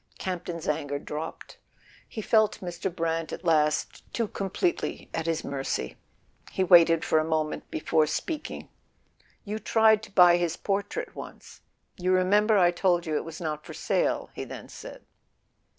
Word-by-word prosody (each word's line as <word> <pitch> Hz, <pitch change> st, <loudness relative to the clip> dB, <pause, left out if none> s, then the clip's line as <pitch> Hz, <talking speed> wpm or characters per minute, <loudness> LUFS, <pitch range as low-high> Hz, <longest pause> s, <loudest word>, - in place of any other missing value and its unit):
Campton's 175 Hz, -3 st, -4 dB
anger 145 Hz, -1 st, -1 dB
dropped: 150 Hz, +3 st, -7 dB, 0.5 s
he 220 Hz, -, -6 dB
felt 215 Hz, -1 st, +3 dB
Mr. 175 Hz, +1 st, -4 dB
Brant 165 Hz, -1 st, -2 dB
at -, -, -7 dB
last 150 Hz, -2 st, +1 dB
too 230 Hz, -2 st, -1 dB
completely 205 Hz, -, -2 dB
at 165 Hz, 0 st, -2 dB
his 165 Hz, -1 st, -1 dB
mercy. 135 Hz, -, -3 dB, 0.6 s
He 190 Hz, -, 0 dB
waited 170 Hz, -2 st, +6 dB
for 160 Hz, -, +3 dB
a -, -, +1 dB
moment 155 Hz, -1 st, -2 dB
before 155 Hz, 0 st, +1 dB
speaking. 295 Hz, -, -4 dB, 0.8 s
"You 215 Hz, +1 st, -4 dB
tried 220 Hz, -1 st, +4 dB
to 220 Hz, -, -12 dB
buy 180 Hz, -3 st, +7 dB
his 170 Hz, -1 st, -1 dB
portrait 205 Hz, -, -2 dB
once—you 185 Hz, 0 st, -7 dB
remember 205 Hz, +4 st, +4 dB
I 175 Hz, -2 st, +5 dB
told 175 Hz, 0 st, +1 dB
you 155 Hz, -2 st, -2 dB
it -, -, 0 dB
was 165 Hz, -1 st, -8 dB
not 155 Hz, -2 st, -4 dB
for -, -, -9 dB
sale," -, -, 0 dB
he -, -, -5 dB
then -, -, -9 dB
said. -, -, -10 dB
175 Hz, 150 wpm, -27 LUFS, 160-200 Hz, 0.8 s, buy